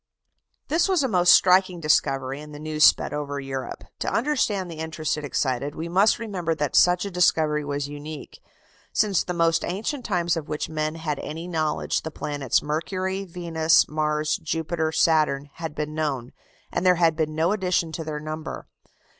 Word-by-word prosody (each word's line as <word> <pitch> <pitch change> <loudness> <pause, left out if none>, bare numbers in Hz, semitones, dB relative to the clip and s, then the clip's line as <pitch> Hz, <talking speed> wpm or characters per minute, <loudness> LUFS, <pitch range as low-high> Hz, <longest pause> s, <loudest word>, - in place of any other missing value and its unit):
This 330 +5 +2
was 365 -6 +2
a - - +2
most 180 -6 +4
striking 185 -1 +5
discovery, 135 -3 +1
and 150 0 -10
the - - -8
news 155 0 -1
sped - - +5
over 145 -1 -3
Europe. 135 -1 -5 0.2
To - - -2
understand 215 - 0
the 160 - -8
interest 160 -1 -2
it 150 - -6
excited 140 0 -1
we 165 - -4
must 190 +5 +3
remember 185 -8 -2
that 150 -3 -2
such 180 +1 +4
a 200 - -5
discovery 155 -4 +2
was 145 0 -3
unique. 145 +1 -9 0.5
Since 205 -4 +2
the 180 - -4
most 165 -1 +2
ancient 220 +9 -3
times 175 -6 0
of 160 -2 -5
which 150 - -3
men 155 0 -2
had 155 -3 -3
any 160 +3 -6
knowledge, 160 -3 -1
the 160 - -5
planets 145 -5 -1
Mercury, 185 +5 -2
Venus, 165 -2 +2
Mars, 150 0 0
Jupiter, 160 0 -2
Saturn, 150 -3 +2
had 160 -3 -6
been 150 0 -3
known, 140 -6 -2 0.4
and - - -1
there 180 -1 +5
had 165 -2 +3
been 155 -1 -1
no 165 +3 +2
addition 185 -5 0
to 160 +1 -5
their 155 -1 -4
number. 155 +1 -6
160 Hz, 180 wpm, -24 LUFS, 150-180 Hz, 0.5 s, striking